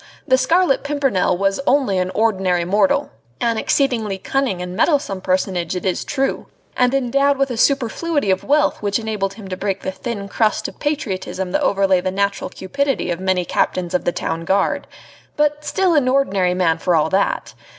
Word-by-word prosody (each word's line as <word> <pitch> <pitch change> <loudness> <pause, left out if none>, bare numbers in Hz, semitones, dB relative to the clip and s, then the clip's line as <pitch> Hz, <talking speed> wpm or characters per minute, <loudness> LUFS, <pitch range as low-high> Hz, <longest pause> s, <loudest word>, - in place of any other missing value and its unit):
The 260 - +5
Scarlet 325 +4 +2
Pimpernel 270 -11 +1
was 195 +3 0
only 255 -9 +2
an 180 0 -1
ordinary 190 -5 +1
mortal 275 +10 +2 0.3
an 230 -2 0
exceedingly 230 -9 0
cunning 255 -2 -1
and 180 0 -5
meddlesome 275 - +1
personage 185 -2 -1
it 180 - -4
is 185 - 0
true, 270 -1 -2 0.3
and 250 -1 +3
endowed 275 +2 +2
with 275 -1 0
a - - -2
superfluity 280 - +1
of 185 - 0
wealth 295 +1 +2
which 200 -1 0
enabled 210 -4 -3
him 210 -4 -10
to 185 - -4
break 195 0 -3
the - - -2
thin 200 0 -5
crust 215 +1 0
of - - -12
patriotism 190 -10 -3
that - - 0
overlay 195 -2 +2
the 185 - -1
natural 200 +1 -1
cupidity 275 0 -2
of 170 - -3
many 185 -1 0
Captains 175 +1 -1
of 180 - +1
the - - +2
Town 165 -1 -3
Guard 195 +3 0 0.5
but 295 0 +1
still 375 +2 +1
an 285 -5 +3
ordinary 200 -9 +2
man 170 -3 +1
for 180 0 +1
all 160 0 +2
that! 195 +1 0
200 Hz, 180 wpm, -20 LUFS, 185-275 Hz, 0.5 s, The